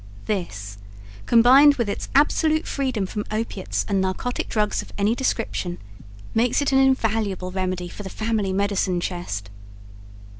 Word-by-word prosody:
This, 105 Hz, -, -4 dB, 0.5 s
combined 265 Hz, +5 st, +7 dB
with 235 Hz, -5 st, -1 dB
its 200 Hz, -, -4 dB
absolute 310 Hz, +2 st, +3 dB
freedom 255 Hz, -8 st, -1 dB
from 210 Hz, +2 st, -4 dB
opiates 215 Hz, -3 st, -3 dB
and 195 Hz, -2 st, +1 dB
narcotic 190 Hz, +6 st, -2 dB
drugs 210 Hz, -2 st, 0 dB
of -, -, -13 dB
any 205 Hz, +2 st, +2 dB
description, 225 Hz, -8 st, -2 dB, 0.6 s
makes 235 Hz, +2 st, +2 dB
it 285 Hz, -, +1 dB
an 265 Hz, -, +4 dB
invaluable 220 Hz, -8 st, +1 dB
remedy 185 Hz, -1 st, -2 dB
for 190 Hz, -, -9 dB
the 195 Hz, -, -7 dB
family 215 Hz, -2 st, -1 dB
medicine 195 Hz, -2 st, 0 dB
chest. 135 Hz, -, -4 dB
210 Hz, 140 wpm, -23 LUFS, 185-245 Hz, 0.6 s, combined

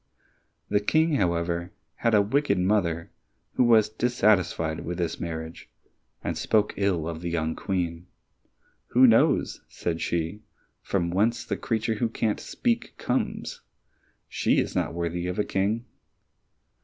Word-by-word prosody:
The 105 Hz, -, +2 dB
King, 155 Hz, +8 st, +2 dB
however, 85 Hz, -2 st, 0 dB, 0.3 s
had 115 Hz, -2 st, +2 dB
a 105 Hz, -, +5 dB
wicked 125 Hz, 0 st, +1 dB
mother 90 Hz, -3 st, 0 dB, 0.4 s
who -, -, +3 dB
was 115 Hz, -3 st, +5 dB
dissatisfied 105 Hz, -8 st, +1 dB
with 85 Hz, +2 st, -5 dB
this 85 Hz, -2 st, -2 dB
marriage 80 Hz, -1 st, -6 dB, 0.5 s
and -, -, -2 dB
spoke 105 Hz, -1 st, +1 dB
ill 95 Hz, -5 st, 0 dB
of 85 Hz, -1 st, -5 dB
the 85 Hz, -, -3 dB
young 80 Hz, -1 st, -1 dB
Queen. 90 Hz, -2 st, -3 dB, 0.8 s
"Who 130 Hz, +2 st, +5 dB
knows," 115 Hz, -2 st, +3 dB
said 85 Hz, -1 st, -3 dB
she, 85 Hz, +5 st, -2 dB, 0.4 s
"from 85 Hz, -3 st, -1 dB
whence 110 Hz, +6 st, +1 dB
the -, -, -2 dB
creature 110 Hz, -1 st, -1 dB
who 115 Hz, -, +2 dB
can't 110 Hz, -1 st, -1 dB
speak, 240 Hz, -1 st, -2 dB
comes? 125 Hz, -, -2 dB, 0.7 s
She -, -, +1 dB
is -, -, 0 dB
not -, -, -1 dB
worthy 85 Hz, +1 st, -2 dB
of 90 Hz, -, -3 dB
a 105 Hz, -, +2 dB
king!" 105 Hz, +5 st, -1 dB
95 Hz, 140 wpm, -26 LUFS, 85-110 Hz, 0.8 s, a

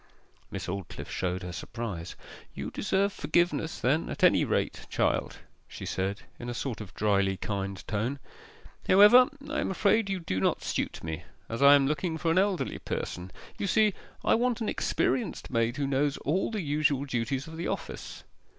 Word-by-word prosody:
Miss -, -, -5 dB
Aldclyffe 95 Hz, 0 st, -5 dB
showed 90 Hz, 0 st, -2 dB
her 90 Hz, -, -5 dB
surprise. 95 Hz, -2 st, -5 dB, 0.4 s
'You -, -, -5 dB
deserve 200 Hz, +1 st, +1 dB
forgiveness 170 Hz, -2 st, 0 dB
then 145 Hz, +6 st, +1 dB
at -, -, -5 dB
any -, -, +6 dB
rate, -, -, -1 dB
child,' -, -, 0 dB, 0.3 s
she -, -, -8 dB
said, 95 Hz, +2 st, -2 dB, 0.2 s
in 120 Hz, -, -5 dB
a 120 Hz, -, -4 dB
sort 115 Hz, -3 st, -3 dB
of 100 Hz, -3 st, -8 dB
drily 100 Hz, -2 st, +2 dB
kind 100 Hz, 0 st, -4 dB
tone. 115 Hz, +6 st, -1 dB, 0.7 s
'However, 210 Hz, +6 st, +8 dB, 0.2 s
I 305 Hz, -, -2 dB
am -, -, -1 dB
afraid 200 Hz, +2 st, +2 dB
you 195 Hz, -1 st, -1 dB
do 95 Hz, -, -2 dB
not -, -, +1 dB
suit -, -, -2 dB
me, 80 Hz, -2 st, -4 dB, 0.3 s
as 115 Hz, +3 st, -4 dB
I 140 Hz, +1 st, +9 dB
am 140 Hz, -1 st, +4 dB
looking 155 Hz, +3 st, -1 dB
for 165 Hz, 0 st, 0 dB
an 175 Hz, -, +4 dB
elderly 195 Hz, -2 st, 0 dB
person. 90 Hz, +1 st, -4 dB, 0.3 s
You 200 Hz, -, -1 dB
see, 215 Hz, +1 st, +4 dB, 0.3 s
I -, -, +5 dB
want 240 Hz, 0 st, +2 dB
an 220 Hz, -, -1 dB
experienced 235 Hz, -, -1 dB
maid 115 Hz, +1 st, +1 dB
who 145 Hz, -, 0 dB
knows 140 Hz, +1 st, +1 dB
all 165 Hz, +7 st, +1 dB
the 215 Hz, -3 st, -2 dB
usual 145 Hz, -2 st, +1 dB
duties 130 Hz, +2 st, -2 dB
of 160 Hz, -, -9 dB
the 170 Hz, -, -3 dB
office. -, -, -5 dB
140 Hz, 180 wpm, -29 LUFS, -, 0.7 s, I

